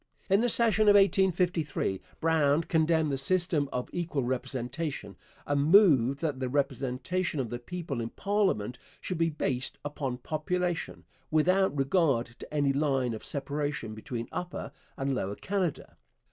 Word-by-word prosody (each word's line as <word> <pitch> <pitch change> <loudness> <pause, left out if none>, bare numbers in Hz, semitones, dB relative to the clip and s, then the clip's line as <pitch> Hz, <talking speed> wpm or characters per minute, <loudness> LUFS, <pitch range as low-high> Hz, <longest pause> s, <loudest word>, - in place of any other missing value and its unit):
In 195 +2 +5
the 245 - +2
session 225 -2 +3
of 205 - +7
1853 180 - +2 0.2
Brown 160 -1 +3
condemned 160 -2 +2
the 135 - -1
system 170 -2 +1
of 125 0 -3
equal 170 -6 -1
representation, 130 +4 -3 0.3
and 145 0 +1
moved 150 - +5
that 150 -5 -1
the 130 -1 -2
representation 140 +5 -1
of 120 -4 -2
the 120 - -3
people 150 -2 -5
in 115 - -3
parliament 195 - 0 0.2
should 180 -3 -4
be 165 0 +3
based 135 -4 -2
upon 140 -4 -3
population, 170 +5 -2 0.2
without 185 +2 +3
regard 135 -4 +2
to - - -10
any 145 -2 +2
line 135 -4 +1
of 110 - -7
separation 140 -4 -3
between 115 +2 -5
Upper 180 0 -5 0.3
and 135 0 -1
Lower 100 -5 -2
Canada. 185 - -3
150 Hz, 145 wpm, -29 LUFS, 130-175 Hz, 0.3 s, of